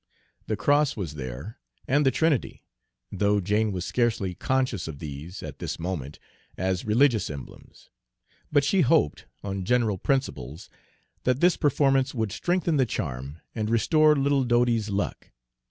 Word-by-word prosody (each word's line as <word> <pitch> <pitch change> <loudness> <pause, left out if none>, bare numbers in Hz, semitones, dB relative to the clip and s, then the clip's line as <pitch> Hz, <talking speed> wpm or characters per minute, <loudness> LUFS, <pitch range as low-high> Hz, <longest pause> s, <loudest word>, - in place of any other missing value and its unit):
The 110 - 0
cross 145 +6 +2
was 85 -8 -4
there, 65 - -7 0.3
and 145 +3 +3
the 135 - +5
Trinity, 155 -2 0 0.5
though 100 +1 +2
Jane 105 +3 +1
was 90 -2 -3
scarcely 110 -6 0
conscious 130 -4 -1
of 80 -3 -6
these, 75 +5 -8
at - - -8
this - - -4
moment, 80 -5 -4 0.4
as 95 0 -1
religious 115 -1 +3
emblems. 70 -3 -11 0.6
But 145 -2 +4
she 185 +6 +3
hoped, 75 - +2 0.2
on 95 -1 -3
general 115 -3 +1
principles, 90 - -2 0.5
that 125 0 +1
this 175 +1 +4
performance 135 -2 +2
would 110 -4 -1
strengthen 175 - 0
the 130 -2 +3
charm 70 - -5
and 110 -2 -2
restore 150 +7 +4
little 140 -1 +2
Dodie's 120 -3 +2
luck. 100 0 -3
110 Hz, 145 wpm, -26 LUFS, 90-135 Hz, 0.6 s, the